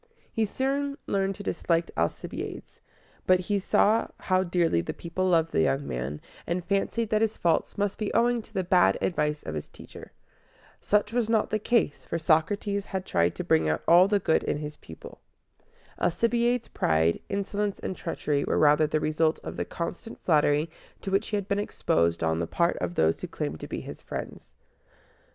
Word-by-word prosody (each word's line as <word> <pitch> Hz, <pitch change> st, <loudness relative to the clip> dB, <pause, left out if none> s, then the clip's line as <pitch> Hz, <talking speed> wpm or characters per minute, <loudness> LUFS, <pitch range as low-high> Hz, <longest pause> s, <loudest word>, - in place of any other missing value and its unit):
He 225 Hz, -, +1 dB
soon 280 Hz, +5 st, -1 dB
learned 195 Hz, 0 st, 0 dB
to 205 Hz, -, -8 dB
dislike 170 Hz, -3 st, 0 dB
Alcibiades; 85 Hz, 0 st, -4 dB, 0.5 s
but 185 Hz, 0 st, +5 dB
he 200 Hz, +2 st, 0 dB
saw 210 Hz, +3 st, +3 dB
how 185 Hz, 0 st, +2 dB
dearly 170 Hz, -, +1 dB
the 85 Hz, -, -5 dB
people 185 Hz, +2 st, -2 dB
loved 165 Hz, -2 st, +3 dB
the -, -, +2 dB
young 135 Hz, -, +1 dB
man, 65 Hz, +4 st, -4 dB, 0.3 s
and 175 Hz, +1 st, -2 dB
fancied 205 Hz, +3 st, 0 dB
that 215 Hz, 0 st, +3 dB
his 220 Hz, -1 st, 0 dB
faults 170 Hz, -2 st, 0 dB
must 205 Hz, -1 st, -1 dB
be 215 Hz, -, -1 dB
owing 240 Hz, 0 st, +3 dB
to -, -, -19 dB
the 190 Hz, -, -1 dB
bad 180 Hz, 0 st, +4 dB
advice 150 Hz, -4 st, -1 dB
of 80 Hz, -, -5 dB
his 75 Hz, -1 st, -5 dB
teacher. -, -, -12 dB, 0.7 s
Such 210 Hz, +1 st, +1 dB
was 235 Hz, -2 st, +1 dB
not 220 Hz, -2 st, +2 dB
the 215 Hz, -, +1 dB
case, 225 Hz, -8 st, +1 dB
for 170 Hz, -, -3 dB
Socrates 200 Hz, +6 st, +1 dB
had 190 Hz, -1 st, -4 dB
tried 85 Hz, +1 st, +1 dB
to -, -, -4 dB
bring 80 Hz, -1 st, +2 dB
out 75 Hz, -, -1 dB
all 175 Hz, +3 st, +7 dB
the 205 Hz, 0 st, +3 dB
good 160 Hz, -4 st, +2 dB
in -, -, -1 dB
his 150 Hz, 0 st, -6 dB
pupil. 80 Hz, -, -12 dB, 0.8 s
Alcibiades' 235 Hz, +5 st, +1 dB
pride, 80 Hz, +1 st, +1 dB
insolence, 200 Hz, 0 st, -2 dB
and 190 Hz, -, -4 dB
treachery 150 Hz, -5 st, -2 dB
were -, -, 0 dB
rather 150 Hz, +1 st, +5 dB
the 155 Hz, +1 st, 0 dB
result 155 Hz, +1 st, +1 dB
of -, -, -6 dB
the -, -, -2 dB
constant 175 Hz, +6 st, -6 dB
flattery 150 Hz, -1 st, +3 dB, 0.3 s
to 195 Hz, -, -4 dB
which 195 Hz, +3 st, +1 dB
he 210 Hz, -, -1 dB
had 200 Hz, -2 st, -4 dB
been 200 Hz, -1 st, 0 dB
exposed 85 Hz, -, 0 dB
on 80 Hz, 0 st, +1 dB
the 85 Hz, -, -1 dB
part 170 Hz, -, +1 dB
of 90 Hz, -1 st, -3 dB
those 80 Hz, 0 st, +2 dB
who -, -, -4 dB
claimed 75 Hz, +2 st, -4 dB
to -, -, -7 dB
be -, -, -4 dB
his -, -, -9 dB
friends. -, -, -7 dB
180 Hz, 190 wpm, -27 LUFS, 150-205 Hz, 0.8 s, all